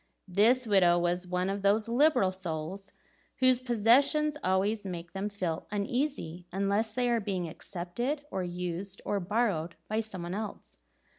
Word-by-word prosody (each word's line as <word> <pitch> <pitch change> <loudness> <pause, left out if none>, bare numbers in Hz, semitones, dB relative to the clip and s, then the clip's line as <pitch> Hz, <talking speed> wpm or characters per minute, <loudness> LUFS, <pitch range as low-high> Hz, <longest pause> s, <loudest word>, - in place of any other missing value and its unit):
This 225 +7 +4
widow 185 -5 +5
was 175 +1 0
one 180 +1 0
of 195 +1 -2
those 205 +3 +2
liberal 245 -5 +4
souls 185 +2 -5 0.4
whose 255 -1 +3
possessions 260 +6 +3
always 195 +3 +1
make 175 -3 -6
them 195 +2 -2
feel 185 -6 -3
uneasy 205 - -2
unless 200 +3 0
they 250 -1 +1
are 235 -1 +2
being 190 -4 -2
accepted, 220 - -4
or 190 - -2
used, 180 +2 -4
or 205 - 0
borrowed 185 -4 0
by 215 +1 0
some 215 -5 -5
one 175 +1 -4
else. 210 - -6
200 Hz, 150 wpm, -30 LUFS, 180-230 Hz, 0.4 s, widow